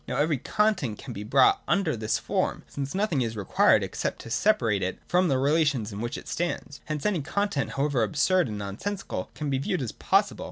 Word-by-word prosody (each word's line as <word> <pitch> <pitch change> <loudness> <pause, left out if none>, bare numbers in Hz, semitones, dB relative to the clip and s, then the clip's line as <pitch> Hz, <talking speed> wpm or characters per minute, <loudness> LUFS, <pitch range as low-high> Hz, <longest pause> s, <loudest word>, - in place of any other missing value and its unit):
Now - - -2
every 150 -2 +1
content 205 - 0
can - - -8
be 100 - -6
brought 130 +5 +4
under 195 -8 +1
this 110 -1 0
form, - - -1
since 140 +3 -5
nothing 190 -9 +1
is 115 -2 -2
required 100 - +3
except - - -3
to 115 - -9
separate 115 - +2
it 95 0 -2
from 180 +1 +3
the 135 - +2
relations 140 -6 +1
in 100 - -5
which 120 0 -3
it - - -10
stands. 175 -4 -3
Hence 150 -1 -4
any 200 -6 +1
content, 200 -2 -1
however 140 -3 +1
absurd 160 - +2
and 105 -2 -5
nonsensical, 105 - -4
can 150 -2 -3
be 135 - +1
viewed 180 +6 -1
as 115 - -3
possible. - - +1
140 Hz, 205 wpm, -27 LUFS, 115-175 Hz, -, brought